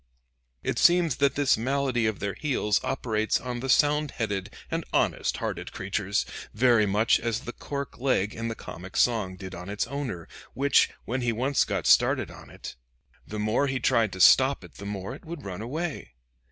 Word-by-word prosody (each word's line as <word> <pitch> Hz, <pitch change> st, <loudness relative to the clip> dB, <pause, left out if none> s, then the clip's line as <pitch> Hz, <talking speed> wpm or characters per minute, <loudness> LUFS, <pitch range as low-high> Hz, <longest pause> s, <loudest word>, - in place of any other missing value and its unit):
It -, -, -1 dB
seems 170 Hz, -5 st, +4 dB
that 140 Hz, -1 st, +2 dB
this 140 Hz, -1 st, +3 dB
malady 130 Hz, -1 st, 0 dB
of 110 Hz, -3 st, -1 dB
their 100 Hz, 0 st, -3 dB
heels 125 Hz, -8 st, 0 dB
operates 110 Hz, -2 st, 0 dB
on 125 Hz, -1 st, -5 dB
the 135 Hz, +2 st, -4 dB
sound 150 Hz, +2 st, +3 dB
headed 100 Hz, -6 st, -3 dB, 0.2 s
and -, -, -1 dB
honest -, -, +1 dB
hearted -, -, -4 dB
creatures, 100 Hz, +1 st, -1 dB, 0.3 s
very 115 Hz, -2 st, +4 dB
much 105 Hz, +4 st, +3 dB
as 115 Hz, 0 st, -2 dB
the 120 Hz, -, -7 dB
cork 140 Hz, -2 st, -6 dB
leg 120 Hz, -6 st, +1 dB
in 115 Hz, 0 st, -4 dB
the 115 Hz, -, -3 dB
comic 90 Hz, -1 st, -8 dB
song 110 Hz, -6 st, +2 dB
did 95 Hz, 0 st, -9 dB
on 90 Hz, +2 st, -8 dB
its 100 Hz, +1 st, -1 dB
owner, 125 Hz, -, -5 dB, 0.3 s
which, 140 Hz, 0 st, +4 dB, 0.2 s
when 125 Hz, +2 st, -2 dB
he 120 Hz, -1 st, +1 dB
once 130 Hz, +5 st, +1 dB
got 95 Hz, -5 st, -2 dB
started -, -, +4 dB
on -, -, -13 dB
it, -, -, -9 dB, 0.5 s
the 105 Hz, -, -6 dB
more 110 Hz, +7 st, +1 dB
he 135 Hz, -1 st, -1 dB
tried 115 Hz, -5 st, +2 dB
to 95 Hz, -, -7 dB
stop 130 Hz, +6 st, +6 dB
it 90 Hz, -, -14 dB
the 100 Hz, -, -7 dB
more 100 Hz, -2 st, -5 dB
it -, -, -11 dB
would 160 Hz, -2 st, -8 dB
run 95 Hz, 0 st, -5 dB
away. 145 Hz, -, -4 dB
115 Hz, 190 wpm, -27 LUFS, 100-135 Hz, 0.5 s, stop